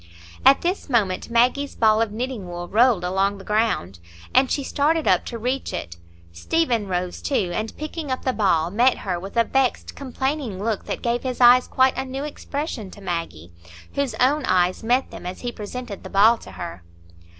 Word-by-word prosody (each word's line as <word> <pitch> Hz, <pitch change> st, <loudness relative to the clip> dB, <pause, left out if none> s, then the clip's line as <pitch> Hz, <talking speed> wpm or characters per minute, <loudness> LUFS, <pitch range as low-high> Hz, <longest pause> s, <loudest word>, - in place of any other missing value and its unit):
At 270 Hz, +1 st, +6 dB
this 355 Hz, -2 st, -2 dB
moment 205 Hz, -7 st, 0 dB
Maggie's 250 Hz, +4 st, +2 dB
ball 220 Hz, -1 st, +4 dB
of 225 Hz, -2 st, 0 dB
knitting 235 Hz, -3 st, -4 dB
wool 175 Hz, 0 st, -6 dB
rolled 225 Hz, -3 st, +3 dB
along 195 Hz, +2 st, 0 dB
the 195 Hz, -, -11 dB
ground, 210 Hz, -, 0 dB, 0.3 s
and 260 Hz, 0 st, +4 dB
she 280 Hz, -, -1 dB
started 305 Hz, +4 st, +1 dB
up -, -, +3 dB
to 235 Hz, -, -5 dB
reach 250 Hz, +4 st, -2 dB
it. 85 Hz, 0 st, -5 dB, 0.3 s
Stephen 230 Hz, -, 0 dB
rose 180 Hz, -1 st, -3 dB
too, 200 Hz, -11 st, 0 dB
and 220 Hz, +3 st, -4 dB
picking 305 Hz, 0 st, -5 dB
up 255 Hz, -, -3 dB
the 260 Hz, -, +1 dB
ball, 175 Hz, -7 st, +1 dB
met 245 Hz, +6 st, +3 dB
her 180 Hz, -3 st, -3 dB
with 195 Hz, +5 st, -8 dB
a 230 Hz, -, +6 dB
vexed, 265 Hz, +2 st, 0 dB
complaining 265 Hz, -4 st, -3 dB
look 210 Hz, +1 st, -2 dB
that -, -, -5 dB
gave 240 Hz, 0 st, 0 dB
his 255 Hz, -2 st, -4 dB
eyes 250 Hz, 0 st, +7 dB
quite 260 Hz, 0 st, +3 dB
a -, -, -1 dB
new 265 Hz, +1 st, -5 dB
expression 285 Hz, -, -5 dB
to 195 Hz, -, -13 dB
Maggie, 165 Hz, -, -5 dB, 0.4 s
whose 275 Hz, -5 st, -1 dB
own 270 Hz, +6 st, +2 dB
eyes 180 Hz, 0 st, +2 dB
met 245 Hz, +4 st, +1 dB
them -, -, -8 dB
as 180 Hz, -, -6 dB
he 245 Hz, -, -3 dB
presented 215 Hz, -1 st, -7 dB
the -, -, -8 dB
ball 215 Hz, +4 st, +5 dB
to 95 Hz, -, -12 dB
her. 90 Hz, -1 st, -7 dB
230 Hz, 195 wpm, -23 LUFS, 190-260 Hz, 0.4 s, eyes